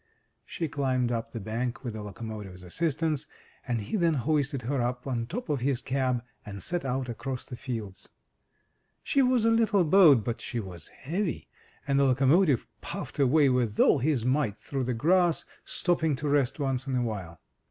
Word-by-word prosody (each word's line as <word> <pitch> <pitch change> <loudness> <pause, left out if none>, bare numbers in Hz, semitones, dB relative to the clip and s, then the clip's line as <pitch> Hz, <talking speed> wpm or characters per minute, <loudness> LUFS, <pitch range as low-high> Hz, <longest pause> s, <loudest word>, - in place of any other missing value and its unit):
She 165 - -3
climbed 130 -4 0
up 115 -1 -2
the 115 - -6
bank 115 +5 -3
with 120 -4 -4
the 110 - -6
locomotive's 105 -2 -7
assistance, 155 - -1 0.4
and 120 -2 0
he 105 - -4
then 170 -4 +2
hoisted 140 -1 0
her 135 +2 -1
up 125 +1 -2
on 120 -4 -2
top 235 - -5
of 145 -4 0
his 130 0 0
cab, 130 -2 -1 0.2
and 100 -2 -8
set 175 0 -2
out 130 -1 -2
across 125 +2 -5
the 125 - -7
fields. 115 -7 -6 0.9
She 275 - +2
was 250 -3 +3
a 230 - +5
little 225 -4 +3
boat 155 - +6
but 115 +2 -3
she 120 - -3
was 90 -6 -8
heavy, 170 +6 -3 0.4
and 140 -1 +2
the 140 - +4
loco 135 +1 +2
motive 150 - +4 0.2
puffed - - -6
away 140 +2 +5
with 120 -4 0
all - - +5
his 130 -3 +1
might 130 -5 +1
through 135 -2 -3
the 125 -1 -1
grass, 175 +6 +2 0.2
stopping 160 -4 +1
to 150 +3 -4
rest 140 -2 +2
once 135 -1 -1
in 130 - -1
a 125 - +1
while. 95 -8 -5
130 Hz, 185 wpm, -28 LUFS, 115-150 Hz, 0.9 s, boat